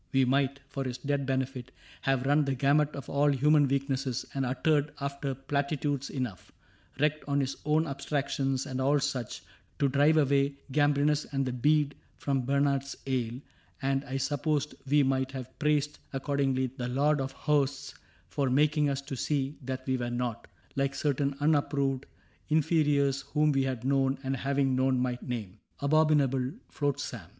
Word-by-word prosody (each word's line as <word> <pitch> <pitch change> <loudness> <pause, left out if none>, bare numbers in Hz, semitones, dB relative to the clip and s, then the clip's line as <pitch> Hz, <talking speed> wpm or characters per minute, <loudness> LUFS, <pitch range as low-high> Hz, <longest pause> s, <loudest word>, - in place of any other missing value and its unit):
We 135 -1 +4
might, 140 +1 +1
for 140 -1 -4
his 125 -2 -4
dead 140 +1 -1
benefit, 130 -1 -2 0.3
have 135 -1 +1
run 145 +2 +3
The 135 -1 0
gamut 145 +3 +2
of 140 - -7
all 145 +1 +2
human 145 +1 +4
weaknesses 135 -2 -1
And 135 -2 -1
uttered 150 +3 +1
after 140 -1 -3
platitudes 140 +1 -1
enough 125 -9 -5 0.2
— - - -28
Wrecked 150 +1 +1
on 140 0 +1
his 135 -1 -1
own 155 +1 +3
abstractions, 140 -2 -1
and 130 -2 -3
all 145 +2 +3
such 135 -4 -3 0.2
— - - -37
To 140 - +2
drive 145 +4 +4
away 140 -1 +3 0.2
Gambrinus 145 +1 +2
and 135 -1 0
the 125 - -2
bead 145 +3 +2 0.2
From 135 -3 -1
Bernard's 140 0 +1
ale; 125 -2 -1 0.4
and 135 0 0
I 135 0 -3
suppose 145 +2 -1 0.2
we 145 0 +5
might 130 0 0
Have 130 -1 -8
praised, 150 -1 +1
accordingly, 135 -2 0
the 120 -2 -3
Lord 140 +3 +2
of 135 0 -3
Hosts 140 -2 0 0.3
For 130 +9 -1
making 150 +2 +3
us 140 0 -1
to 140 - -5
see 140 +2 -1
that 130 0 -5
we 130 -1 0
were 120 -1 -2
not 120 -1 -3 0.3
(Like 140 0 0
certain 140 -1 0
unapproved 140 -3 +1 0.4
inferiors 145 -3 +2
Whom 150 +1 +1
we 135 -1 +2
had 130 -3 -3
known, 135 0 +2
and 135 0 -1
having 135 0 +1
known 130 0 +2
might 125 -1 -1
name) 110 -5 -5 0.2
Abominable 140 -3 +2 0.2
flotsam. 145 -2 -3
140 Hz, 165 wpm, -29 LUFS, 130-145 Hz, 0.4 s, we